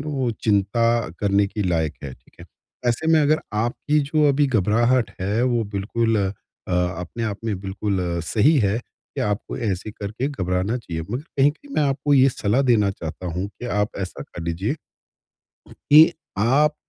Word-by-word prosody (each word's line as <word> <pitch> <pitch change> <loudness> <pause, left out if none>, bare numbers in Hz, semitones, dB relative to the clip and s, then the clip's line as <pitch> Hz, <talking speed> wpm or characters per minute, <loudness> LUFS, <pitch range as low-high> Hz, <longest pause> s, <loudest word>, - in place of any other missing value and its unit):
ना - - -3
वो 130 -3 0 0.2
चिंता 115 +3 +2
करने 100 0 +3
के 105 +1 -3
लायक 80 -4 0
है। 70 -3 -6
ठीक - - -28
है। - - -9 0.4
ऐसे 120 +7 0
में 160 - +5
अगर 155 +1 +3
आपकी 120 +7 0
जो 150 -1 +4
अभी 145 +1 +3
घबराहट 120 +1 +2
हैं 105 +5 0
वो 120 -2 +2
बिल्कुल 115 +3 0 0.5
अ, - - -2
अपने 90 +4 -2
आप 105 -2 -3
में 105 -4 -1
बिल्कुल 100 0 -2 0.2
सही 130 - +3
है 105 -2 +1 0.4
कि - - -1
आपको 105 +1 -2
ऐसे 100 -1 -2
करके 105 +6 -4
घबराना 95 -4 -1
चाहिए। 85 -9 -5
मगर 125 +5 -3
कहीं-कहीं 150 - -1
मैं - - +2
आपको 140 +1 +1
ये 135 0 +6
सलाह 120 +1 +1
देना 110 -6 +3
चाहता 90 -1 -7
हूँ 90 +3 -2
कि 120 - -9
आप 105 -3 0
ऐसा 95 -2 -5
कर 85 - -9
लीजिए, 90 - -2 1.0
कि 155 +3 +6 0.3
आप 140 +8 +3
110 Hz, 170 wpm, -22 LUFS, 100-130 Hz, 1.0 s, ये